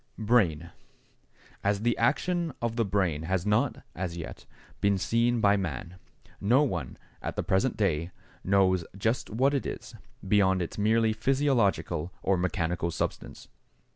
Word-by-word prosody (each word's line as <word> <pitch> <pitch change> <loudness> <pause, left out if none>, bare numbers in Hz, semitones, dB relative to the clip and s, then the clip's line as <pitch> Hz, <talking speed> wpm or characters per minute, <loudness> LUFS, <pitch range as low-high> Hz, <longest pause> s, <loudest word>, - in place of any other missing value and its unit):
=Brain.= 95 -8 +2 0.9
As 100 0 +1
the 120 +1 +2
action 165 +6 +1
of 120 -1 -2
the 115 - +2
brain 95 -7 0
has 90 +2 -1
not, 105 0 +1
as 85 -1 -4
yet, 85 - -8 0.3
been 100 -1 +2
seen 115 +4 +1
by 100 0 +4
man, 85 -1 -4 0.4
no 125 +8 +4
one, 85 - -3 0.2
at - - -4
the - - -1
present 95 +7 +1
day, 85 -5 0 0.3
knows 95 -2 +3
just 115 +5 -1
what 130 +6 +2
it 140 - -1
is, - - -7 0.3
beyond 95 -2 +3
its 85 +3 -4
merely 110 +1 +3
physiological 110 - +1
or 95 - +3
mechanical 85 -1 -1
substance. 85 - -4
100 Hz, 140 wpm, -28 LUFS, 90-115 Hz, 0.9 s, by